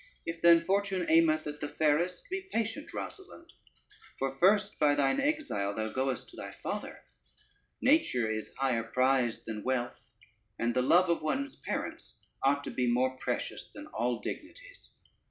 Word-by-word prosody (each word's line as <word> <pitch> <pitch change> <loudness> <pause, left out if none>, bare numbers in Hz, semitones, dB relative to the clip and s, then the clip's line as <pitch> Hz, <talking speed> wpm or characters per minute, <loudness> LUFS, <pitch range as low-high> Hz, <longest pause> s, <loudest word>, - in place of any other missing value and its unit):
If 165 0 -5
then 170 -1 +6
fortune 195 -1 0
aimeth 160 -1 +4
at 150 0 -6
the 145 - -3
fairest, 160 +5 +1
be 385 0 -4
patient 230 +5 -2
Rosalynde, 355 -4 -8 0.7
for 135 0 -2
first 205 +2 +3
by 145 -1 +4
thine 140 - +2
exile 275 - -1
thou 110 0 -2
goest 130 +1 -2
to - - -15
thy - - -7
father: - - -6 0.8
nature 250 - +3
is 110 0 -3
higher 130 -4 +1
prize 125 +1 +1
than 110 -2 -5
wealth, 125 -2 -1 0.6
and 120 0 0
the 125 - +2
love 170 +7 +4
of 170 - 0
one's 275 - -2
parents - - -5 0.3
ought 140 +1 +2
to - - -5
be 125 -1 +1
more 130 +2 +2
precious - - -3
than - - -9
all 120 +2 0
dignities. - - -8
150 Hz, 155 wpm, -31 LUFS, 125-200 Hz, 0.8 s, then